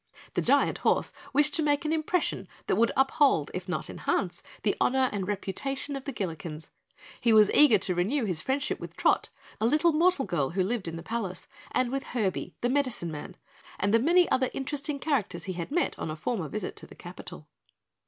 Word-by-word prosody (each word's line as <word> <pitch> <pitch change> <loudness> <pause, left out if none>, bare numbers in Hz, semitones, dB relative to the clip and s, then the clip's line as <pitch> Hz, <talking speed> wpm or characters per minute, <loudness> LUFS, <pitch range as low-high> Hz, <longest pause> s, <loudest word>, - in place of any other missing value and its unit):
The - - +1
giant - - +3
horse - - +1 0.2
wished 290 +1 +3
to 325 - +1
make 290 +1 +1
an 305 - +1
impression 315 - 0 0.2
that - - +1
would 230 +3 +3
uphold 270 - +3
if 185 +1 -5
not 165 -4 -1
enhance 175 -2 -2 0.2
the 205 - +2
honor 260 0 +3
and 195 -3 -3
reputation 265 +8 -3
of 270 - -6
the 280 - -3
Gillikens. 165 - -5 0.5
He 235 - +3
was 215 -2 +6
eager 290 -8 +6
to 185 -1 0
renew 215 +9 0
his 175 -6 +1
friendship 275 +2 -1
with - - -9
Trot, - - +2 0.3
a 220 - +2
little 310 +6 +3
mortal 330 -2 +3
girl 145 -6 0
who 185 +2 0
lived 210 -1 -2
in 165 - -4
the 165 - -7
palace 210 -3 -4 0.2
and 250 -1 0
with 270 -2 -4
Herby, 190 -5 -1
the 245 - +2
Medicine 255 - 0
Man, 155 +4 -8 0.4
and 200 +1 +1
the 230 - +6
many 345 +7 +4
other 260 -1 +2
interesting 285 +1 -3
characters 225 - -1
he 190 - -4
had 170 -1 -5
met 345 +4 0
on - - -3
a 155 - -3
former 175 +2 -2
visit 215 - -4
to - - -9
the - - -14
capital. - - -10
230 Hz, 200 wpm, -28 LUFS, 185-280 Hz, 0.5 s, was